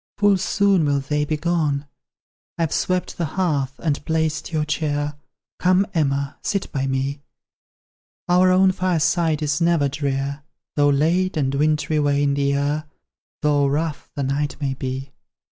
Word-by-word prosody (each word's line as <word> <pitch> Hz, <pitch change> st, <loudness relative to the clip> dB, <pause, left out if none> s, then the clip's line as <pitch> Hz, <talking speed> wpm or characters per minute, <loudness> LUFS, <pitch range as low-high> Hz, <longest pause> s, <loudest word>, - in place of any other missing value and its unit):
Full 205 Hz, -1 st, +4 dB
soon 195 Hz, -1 st, +2 dB
will 140 Hz, -1 st, +2 dB
they 150 Hz, +2 st, -1 dB
be 155 Hz, +1 st, -1 dB
gone. 150 Hz, -3 st, 0 dB, 0.7 s
I've 165 Hz, -2 st, 0 dB
swept 185 Hz, -1 st, -1 dB
the 170 Hz, -, +1 dB
hearth, 145 Hz, -7 st, 0 dB
and 150 Hz, -4 st, -2 dB
placed 160 Hz, 0 st, -1 dB
your 155 Hz, -2 st, 0 dB
chair. 150 Hz, -1 st, -1 dB, 0.5 s
Come, 185 Hz, +2 st, +3 dB
Emma, 140 Hz, -3 st, 0 dB
sit 200 Hz, -1 st, -2 dB
by 135 Hz, -2 st, -1 dB
me; 135 Hz, +2 st, -2 dB, 1.1 s
Our 180 Hz, +1 st, +4 dB
own 185 Hz, +1 st, +5 dB
fireside 170 Hz, -3 st, +1 dB
is 150 Hz, +2 st, 0 dB
never 165 Hz, -4 st, +3 dB
drear, 140 Hz, 0 st, -2 dB, 0.3 s
Though 145 Hz, -1 st, +4 dB
late 165 Hz, +6 st, +2 dB
and 135 Hz, -2 st, 0 dB
wintry 150 Hz, +1 st, +1 dB
wane 145 Hz, -1 st, +2 dB
the 140 Hz, -, -1 dB
year, 140 Hz, +2 st, 0 dB, 0.6 s
Though 145 Hz, -1 st, +3 dB
rough 150 Hz, +2 st, -2 dB
the 140 Hz, -, -2 dB
night 145 Hz, +2 st, -1 dB
may 140 Hz, -2 st, -1 dB
be." 135 Hz, 0 st, -5 dB
150 Hz, 145 wpm, -22 LUFS, 140-170 Hz, 1.1 s, own